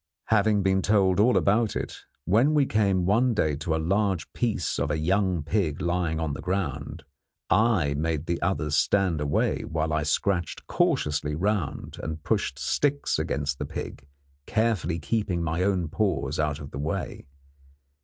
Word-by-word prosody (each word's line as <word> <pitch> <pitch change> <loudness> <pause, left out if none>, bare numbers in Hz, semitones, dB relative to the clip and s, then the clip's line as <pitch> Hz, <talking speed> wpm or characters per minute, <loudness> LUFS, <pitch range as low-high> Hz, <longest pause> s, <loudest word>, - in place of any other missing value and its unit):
Having 105 -2 +3
been 95 0 +2
told 95 -2 +3
all 120 +4 +4
about 105 +2 +2
it, - - -3 0.3
when 120 - +3
we 145 -2 +4
came 100 -6 +1
one 115 +5 +3
day 75 -7 +1
to 80 +2 -1
a - - +1
large 95 0 0
piece 110 -9 -1
of - - 0
a 75 - 0
young 90 0 +1
pig 80 -3 -1
lying 85 -3 -1
on 80 -3 -2
the - - -6
ground, 90 -4 -3 0.5
I 105 -10 +3
made 80 +1 -1
the 85 0 -2
others 75 -4 0
stand 95 -6 +2
away 70 -1 0
while 80 0 -2
I 75 - +1
scratched 85 +3 -1
cautiously 75 0 0
round 100 -1 -2
and 80 0 -5
pushed 65 - -1
sticks 145 - 0
against 70 0 -2
the - - -2
pig, 70 - -7 0.4
carefully 110 -7 0
keeping 85 +2 -1
my 80 +1 -1
own 95 -3 +1
paws 75 -6 -1
out 75 -1 0
of 70 -1 -9
the - - -6
way. 80 +1 -4
85 Hz, 165 wpm, -26 LUFS, 75-100 Hz, 0.5 s, all